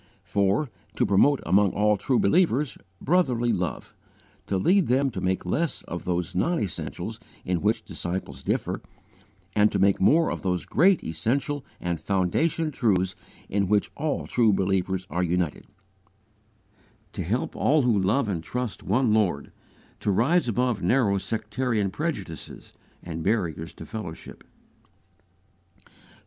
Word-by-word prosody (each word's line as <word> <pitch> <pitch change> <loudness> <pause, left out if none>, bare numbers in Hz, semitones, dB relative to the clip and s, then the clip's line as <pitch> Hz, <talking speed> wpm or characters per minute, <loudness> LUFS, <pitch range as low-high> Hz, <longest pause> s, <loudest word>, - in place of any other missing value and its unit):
4. 100 +8 +1 0.3
To 125 - +2
promote 115 +8 +4
among 100 0 +3
all 105 +1 +3
true 125 +6 0
believers, 145 - +2 0.2
brotherly 130 -8 +2
love; 90 -2 -3 0.5
to 95 - 0
lead 180 - +3
them 135 +2 +2
to - - -5
make 95 0 -1
less 150 - -1
of 85 - -6
those 90 -1 -1
non 170 - +1
essentials 80 -8 -4 0.3
in 90 -2 0
which 110 +2 +1
disciples 85 -7 -4
differ, - - -2 0.7
and 105 0 +4
to - - 0
make 100 0 +3
more 160 - +4
of - - -4
those 90 -2 -1
great 185 +5 +3
essential 130 - -1 0.2
and 85 -2 -2
foundation 150 - 0
truths 95 -8 +1 0.3
in 100 0 0
which 105 +1 +1
all 150 0 -2
true 115 -3 +3
believers 95 -1 0
are 85 +3 0
united; 90 -3 -1 1.5
to - - -4
help - - -2
all 150 0 +3
who 115 -5 +3
love 110 +7 +1
and 90 -5 -2
trust 125 +4 -4
one 115 +3 +2
Lord 95 -10 +1 0.5
to - - -2
rise 125 - +3
above 120 -1 0
narrow 100 0 +2
sectarian 110 0 -1
prejudices, 105 - -5 0.3
and 85 -1 -5
barriers 85 -5 -1
to - - -10
fellowship. 105 -7 -8
105 Hz, 135 wpm, -26 LUFS, 90-130 Hz, 1.5 s, promote